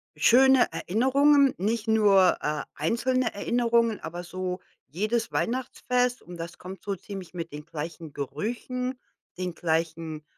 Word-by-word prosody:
schöne 265 +1 +6
Erinnerungen, 275 +6 +3
nicht 215 +4 -1
nur, 205 -4 +5
äh, 150 0 -1
einzelne 240 - 0
Erinnerungen, 230 +1 +1
aber 175 +2 -6
so 185 +1 -4 0.3
jedes 215 - -1
Weihnachtsfest. 250 0 0
Und 175 0 -10
das 170 +1 -7
kommt 190 +1 -9
so 200 -1 -2
ziemlich 190 -1 -9
mit 165 -2 -5
den 150 0 -8
gleichen 160 0 -7
Gerüchen, 245 - -4 0.4
den 180 -1 -3
gleichen, 160 -2 -2
200 Hz, 125 wpm, -27 LUFS, 170-245 Hz, 0.4 s, schöne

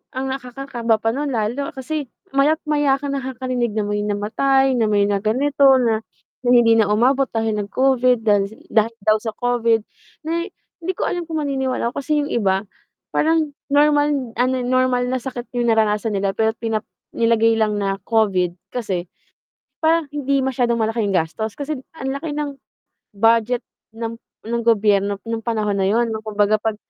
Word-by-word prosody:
ang 265 +1 -2
nakakakaba 250 -3 -2
pa 225 - +1
nun 285 +2 -2
lalo 240 +5 -1
kasi 275 +2 -4 0.3
maya't 300 +4 +3
maya 290 -2 +3
ka 285 - -5
nakakarinig 255 -3 -2
na 215 - 0
may 205 0 -1
namatay, 265 +6 +1
na 225 -3 +2
may 205 -1 +3
na 200 -1 +1
ganito 270 +4 +4
na 225 -3 +1 0.4
na 245 - +1
hindi 235 -2 +6
na 205 - +3
umabot 260 +5 +3
dahil 225 -1 -1
nag-Covid 250 +2 +2
dahi 205 0 0
dahil 225 +1 +2
daw 215 0 +5
sa 225 - -3
Covid. 235 -2 +1 0.4
Na 335 +1 0 0.4
di 370 +3 -1
ko - - -1
alam 350 -1 -2
kung 320 -1 -3
maniniwala 265 -4 -1
ako 280 - -4
kasi 300 +1 +1
yung 290 - -5
iba 195 -4 +1 0.5
parang 315 -1 +2 0.2
normal 290 -3 +3
ano, 255 +1 +2
normal 255 0 +1
na 260 - 0
sakit 245 -1 -7
yung 240 -1 +1
naranasan 215 -1 +1
nila, 195 0 0
pero 220 +1 +1
pinap 225 -1 -2 0.3
nilagay 230 -1 +3
lang 215 -1 +1
na 195 -1 -1
Covid 190 -6 +2 0.2
kasi 190 -8 -3 0.8
parang 325 -1 +3
hindi 280 -1 0
masyadong 245 -3 0
malaki 225 +1 0
yung 195 - -1
gastos. 195 +6 -1
Kasi 290 0 -3 0.2
ang 265 -4 -4
laki 295 +1 -4
ng 290 -2 -4 0.6
budget 230 +3 +3 0.4
ng 230 0 -4 0.3
ng 235 0 0
gobyerno 205 -3 +3
nung 230 -1 -2
panahon 215 -3 0
na 190 - +1
yun, 230 +3 +2
nung 220 0 -5
kumbaga 210 0 +2
'pag 220 -1 -1
235 Hz, 170 wpm, -21 LUFS, 215-270 Hz, 0.8 s, hindi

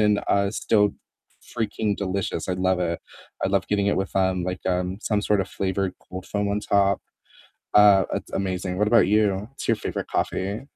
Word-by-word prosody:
and, 105 -1 +3
uh, 100 0 +2
still 105 -2 +2 0.5
freaking 105 -2 -2
delicious, 95 -3 -3
I - - +1
love 95 0 +1
it, 85 -1 -1 0.4
I - - +2
love 100 -1 +1
getting 100 -1 +1
it - - +1
with, 95 +1 -3
um, 95 -2 +1
like, 90 0 -4
um, 90 +1 -1
some 105 -2 +1
sort 105 -1 +2
of - - -3
flavored 95 -1 -1 0.2
cold 95 0 -7
foam 105 -1 -1
on 105 +1 0
top, 100 -1 +2 0.7
uh, 100 -2 +7
it's - - -5
amazing. 95 -1 -2
What 105 - +2
about 115 0 +5
you? 105 -1 +3
What's 135 - -8
your 115 - +3
favorite - - -4
coffee? 100 +6 -2
100 Hz, 190 wpm, -24 LUFS, 95-105 Hz, 0.7 s, uh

